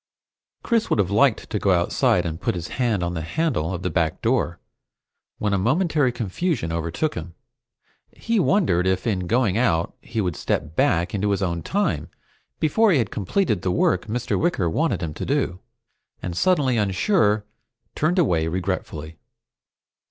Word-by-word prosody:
Chris 230 Hz, -2 st, +1 dB
would -, -, +2 dB
have 100 Hz, -2 st, +1 dB
liked 110 Hz, +3 st, +3 dB
to 105 Hz, -, -2 dB
go 100 Hz, -, 0 dB
outside 90 Hz, -1 st, +2 dB
and 80 Hz, +1 st, -4 dB
put -, -, 0 dB
his 85 Hz, -1 st, -5 dB
hand 115 Hz, -8 st, 0 dB
on 85 Hz, 0 st, -2 dB
the 80 Hz, -, -3 dB
handle 95 Hz, -, -1 dB
of 90 Hz, 0 st, -4 dB
the 90 Hz, -, 0 dB
back 85 Hz, 0 st, 0 dB
door, 110 Hz, -, 0 dB, 0.8 s
when 105 Hz, -1 st, -1 dB
a 100 Hz, -, +2 dB
momentary 150 Hz, -, +2 dB
confusion 120 Hz, -, -2 dB
overtook 85 Hz, -, -1 dB
him. 85 Hz, 0 st, -7 dB, 0.8 s
He 230 Hz, -1 st, -1 dB
wondered 165 Hz, -, +2 dB
if 95 Hz, 0 st, 0 dB
in 95 Hz, -6 st, -1 dB
going 115 Hz, -2 st, +2 dB
out 85 Hz, -9 st, +1 dB
he 115 Hz, -1 st, -5 dB
would 90 Hz, -6 st, -1 dB
step 75 Hz, +2 st, -2 dB
back 85 Hz, +2 st, +2 dB
into 105 Hz, 0 st, 0 dB
his 100 Hz, -1 st, 0 dB
own 85 Hz, -2 st, -1 dB
time 85 Hz, -, -1 dB, 0.5 s
before 215 Hz, +8 st, +3 dB
he 165 Hz, -, +4 dB
had 115 Hz, -6 st, 0 dB
completed 110 Hz, -, 0 dB
the 95 Hz, -, -1 dB
work 90 Hz, +1 st, +1 dB
Mr. 120 Hz, +2 st, -1 dB
Wicker 165 Hz, -, +1 dB
wanted 150 Hz, -, 0 dB
him 80 Hz, -2 st, -3 dB
to -, -, -6 dB
do, 135 Hz, -11 st, -1 dB, 0.6 s
and 90 Hz, -2 st, -5 dB
suddenly 140 Hz, -, +2 dB
unsure, 105 Hz, -, +2 dB, 0.5 s
turned 165 Hz, +5 st, 0 dB
away 85 Hz, -, +2 dB
regretfully. 80 Hz, -2 st, -4 dB
100 Hz, 165 wpm, -23 LUFS, 85-135 Hz, 0.8 s, he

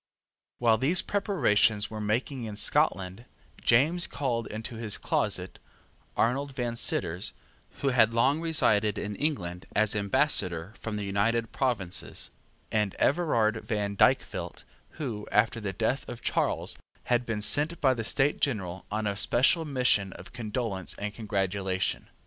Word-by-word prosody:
While 115 Hz, -2 st, +3 dB
these 160 Hz, +8 st, +2 dB
preparations 110 Hz, -, +2 dB
were 110 Hz, -1 st, -5 dB
making 120 Hz, +4 st, -1 dB
in 105 Hz, -2 st, -6 dB
Scotland, 95 Hz, +2 st, +1 dB, 0.4 s
James 160 Hz, +9 st, +4 dB
called 120 Hz, -5 st, -2 dB
into 110 Hz, +2 st, -6 dB
his 110 Hz, -3 st, -1 dB
closet -, -, -1 dB, 0.6 s
Arnold 135 Hz, +4 st, 0 dB
Van 120 Hz, -2 st, -2 dB
Citters, 90 Hz, -5 st, -1 dB, 0.5 s
who 140 Hz, -, +3 dB
had 115 Hz, -3 st, +4 dB
long 135 Hz, +7 st, +2 dB
resided 110 Hz, -10 st, +2 dB
in 105 Hz, 0 st, -4 dB
England 90 Hz, -, -3 dB
as 110 Hz, 0 st, +2 dB
Ambassador 100 Hz, -, +1 dB
from 110 Hz, -2 st, -5 dB
the 105 Hz, -1 st, -3 dB
United 115 Hz, +4 st, 0 dB
Provinces, 110 Hz, -9 st, -2 dB, 0.4 s
and 105 Hz, -3 st, 0 dB
Everard 120 Hz, -9 st, +2 dB
Van 105 Hz, -3 st, -2 dB
Dykvelt, -, -, +1 dB, 0.3 s
who, 120 Hz, -9 st, -4 dB
after 115 Hz, +2 st, +2 dB
the 105 Hz, -3 st, -3 dB
death 115 Hz, +7 st, -1 dB
of 120 Hz, -, -8 dB
Charles, -, -, 0 dB, 0.2 s
had 120 Hz, 0 st, +1 dB
been 115 Hz, -3 st, -3 dB
sent 155 Hz, +8 st, +3 dB
by 130 Hz, -2 st, +4 dB
the 115 Hz, -3 st, -4 dB
State 135 Hz, +5 st, +1 dB
General 95 Hz, -9 st, -1 dB
on 110 Hz, +1 st, -2 dB
a 100 Hz, -1 st, -1 dB
special 130 Hz, -, +3 dB
mission 125 Hz, -9 st, +1 dB
of -, -, -12 dB
condolence 110 Hz, -4 st, -4 dB
and 105 Hz, 0 st, -4 dB
congratulation. 95 Hz, -3 st, -2 dB
110 Hz, 140 wpm, -28 LUFS, 105-130 Hz, 0.6 s, James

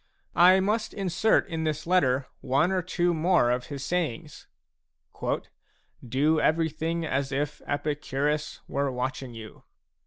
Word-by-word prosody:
I 185 Hz, +2 st, +7 dB
must 215 Hz, +3 st, -1 dB
insert 195 Hz, +2 st, +2 dB
in 165 Hz, -3 st, -3 dB
this 155 Hz, -1 st, -2 dB
letter 140 Hz, -7 st, +2 dB
one 140 Hz, +8 st, +1 dB
or 185 Hz, -1 st, +1 dB
two 175 Hz, 0 st, 0 dB
more 160 Hz, -6 st, +3 dB
of 125 Hz, 0 st, -2 dB
his 140 Hz, -2 st, -6 dB
sayings: 165 Hz, -4 st, -3 dB, 0.7 s
a -, -, 0 dB, 0.6 s
"Do 145 Hz, +6 st, +2 dB
everything 160 Hz, +1 st, 0 dB
as 135 Hz, -2 st, -1 dB
if 145 Hz, +2 st, -2 dB
Epicurus 145 Hz, 0 st, -2 dB
were 140 Hz, -1 st, -1 dB
watching 125 Hz, 0 st, -4 dB
you." 110 Hz, -1 st, -10 dB
155 Hz, 130 wpm, -27 LUFS, 135-175 Hz, 0.7 s, I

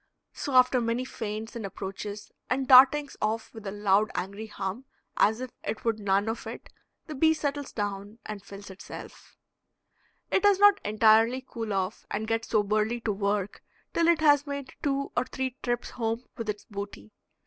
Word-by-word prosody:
So 280 Hz, -, -4 dB
after 255 Hz, 0 st, +5 dB
many 235 Hz, +2 st, -1 dB
feints 220 Hz, -1 st, -5 dB
and 230 Hz, -, -5 dB
approaches 200 Hz, +1 st, -6 dB, 0.2 s
and 265 Hz, +1 st, 0 dB
dartings 275 Hz, +2 st, +7 dB
off 220 Hz, +1 st, -1 dB
with 220 Hz, -3 st, -9 dB
a -, -, -3 dB
loud 205 Hz, +1 st, +2 dB
angry 200 Hz, +4 st, -4 dB
hum 205 Hz, +4 st, -5 dB, 0.3 s
as 220 Hz, +3 st, +3 dB
if 255 Hz, -1 st, -5 dB
it 220 Hz, -, -4 dB
would 225 Hz, -2 st, +1 dB
none 200 Hz, 0 st, +1 dB
of 225 Hz, +1 st, -3 dB
it, -, -, -8 dB, 0.4 s
the 310 Hz, -, -7 dB
bee 315 Hz, +3 st, +3 dB
settles 290 Hz, -2 st, -3 dB
down 205 Hz, 0 st, -4 dB
and 210 Hz, -2 st, -6 dB
fills 200 Hz, 0 st, -10 dB
itself. 190 Hz, -, -11 dB, 0.9 s
It -, -, +3 dB
does 405 Hz, -1 st, +5 dB
not 410 Hz, 0 st, +6 dB
entirely 225 Hz, +4 st, +4 dB
cool 225 Hz, -2 st, -5 dB
off 195 Hz, +1 st, -2 dB
and 215 Hz, +2 st, -2 dB
get 225 Hz, 0 st, 0 dB
soberly 215 Hz, +2 st, +1 dB
to 225 Hz, -, 0 dB
work 200 Hz, 0 st, -1 dB, 0.3 s
till 335 Hz, 0 st, +2 dB
it 340 Hz, -2 st, +4 dB
has 290 Hz, -1 st, +5 dB
made 280 Hz, -1 st, -5 dB
two 275 Hz, -1 st, -1 dB
or 245 Hz, -, +2 dB
three 260 Hz, -1 st, -3 dB
trips 240 Hz, -1 st, -2 dB
home 230 Hz, +1 st, -2 dB
with 230 Hz, -3 st, -5 dB
its 210 Hz, 0 st, -4 dB
booty. 200 Hz, -, -8 dB
225 Hz, 175 wpm, -28 LUFS, 205-260 Hz, 0.9 s, dartings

